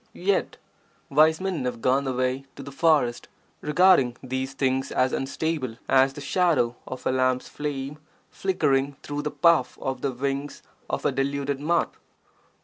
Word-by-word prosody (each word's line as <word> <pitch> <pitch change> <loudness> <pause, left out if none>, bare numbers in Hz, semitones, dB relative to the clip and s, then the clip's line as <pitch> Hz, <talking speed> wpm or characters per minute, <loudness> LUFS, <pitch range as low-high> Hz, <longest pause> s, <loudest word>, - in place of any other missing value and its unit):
Yet, 195 +2 0 0.5
wise 155 +3 +5
men 185 -7 -2
have 125 -2 -3
gone 135 +3 +1
away 130 +1 -1
to 140 - -8
the 140 - -9
forest, 140 -6 +2 0.3
regarding 150 -6 +4
these 130 +1 -3
things 135 0 0
as 130 0 +1
unstable 135 -3 -2
as 135 0 +4
the 145 - -8
shadow 150 -6 +1
of 130 - -7
a - - +2
lamp's 130 -1 +1
flame 145 0 -5 0.3
flickering 140 -7 0
through 145 0 -3
the 150 - -2
puff 170 +1 +3
of 135 -1 -3
the 140 - 0
wings 140 +3 -3 0.3
of - - -3
a - - +3
deluded 140 0 -1
moth. 170 +4 0
140 Hz, 150 wpm, -25 LUFS, 130-150 Hz, 0.5 s, wise